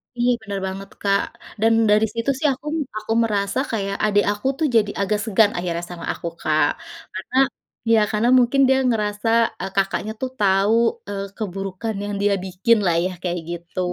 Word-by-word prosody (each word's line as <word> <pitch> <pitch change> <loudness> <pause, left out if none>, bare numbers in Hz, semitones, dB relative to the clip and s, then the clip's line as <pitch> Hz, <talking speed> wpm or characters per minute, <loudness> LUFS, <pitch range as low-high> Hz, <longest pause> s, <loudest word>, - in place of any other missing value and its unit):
Iya, 240 0 +1
benar 200 -2 -4
banget, 195 +1 -6
Kak. 200 0 +2 0.4
Dan 225 0 +4 0.2
dari 215 +1 +5
situ 230 +3 -2
sih 305 - +2
aku 270 +3 -14
m - - -1 0.2
aku 215 +1 -6
merasa 205 +1 0
kayak 200 -3 -2
adik 205 -1 +3
aku 210 +5 -3
tuh 315 - +2
jadi 210 -2 +3
agak 210 +1 0
segan 215 -1 +4
akhirnya 175 -1 -2
sama 175 -1 -7
aku, - - -6
Kak. 155 -1 +3 0.5
Karena 190 +6 -7 0.6
ya, 225 - +6
karena 220 +3 +2
mungkin 255 +3 +3
dia 265 - +4
ngerasa, 210 -1 -1 0.3
e - - -4
Kakaknya 195 +2 0
tuh 260 - -1
tahu, 195 +1 +3 0.3
eee, 200 -1 -4
keburukan 195 +1 -4
yang 205 0 -4
dia 205 0 +3
bikin 190 +5 +2
lah 170 -2 +3
ya, 185 - -1
kayak 175 -1 -2
gitu. 175 +2 -7
205 Hz, 180 wpm, -22 LUFS, 195-225 Hz, 0.6 s, ya